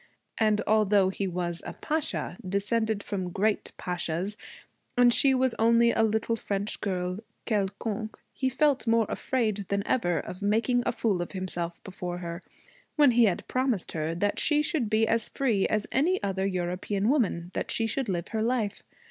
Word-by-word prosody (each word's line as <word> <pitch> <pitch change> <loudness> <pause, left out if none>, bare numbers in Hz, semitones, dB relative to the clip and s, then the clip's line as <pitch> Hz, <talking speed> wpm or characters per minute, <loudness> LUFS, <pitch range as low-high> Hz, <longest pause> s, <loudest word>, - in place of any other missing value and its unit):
And 215 -1 +3
although 205 -3 +4
he 195 +1 -2
was 175 -1 -3
a - - -6
pasha, 310 - -2
descended 205 +2 0
from 185 -3 -3
great 205 +4 0
pashas, 180 +2 -2 0.6
and 245 -1 +6
she 270 +1 +5
was 260 -1 +2
only 235 +1 +5
a - - +1
little 220 +1 +1
French 205 -2 -3
girl 180 -1 -2 0.3
quelconque, 215 +1 -2 0.2
he 260 - 0
felt 275 0 +2
more 230 0 +4
afraid 215 -6 -1
than 200 +1 -1
ever 175 -9 +1
of 180 +6 -7
making 225 +4 +2
a - - +3
fool 210 -6 0
of 175 - -5
himself 175 -3 -3
before 180 -2 -5
her 170 0 -6 0.5
when 290 -4 +6
he 235 0 +5
had 190 -5 0
promised 255 -7 0
her 160 +1 -2
that 205 +4 0
she 300 -1 +3
should 300 -10 0
be 220 +1 +3
as 230 -1 +1
free 230 -8 +1
as 215 -1 0
any 335 +8 +2
other 195 -1 0
European 185 +2 -1
woman, 200 - +1
that - - -3
she 225 - +1
should 235 +1 -2
live 175 -2 -2
her 220 -1 -2
life. 225 -3 0
210 Hz, 175 wpm, -28 LUFS, 185-235 Hz, 0.6 s, and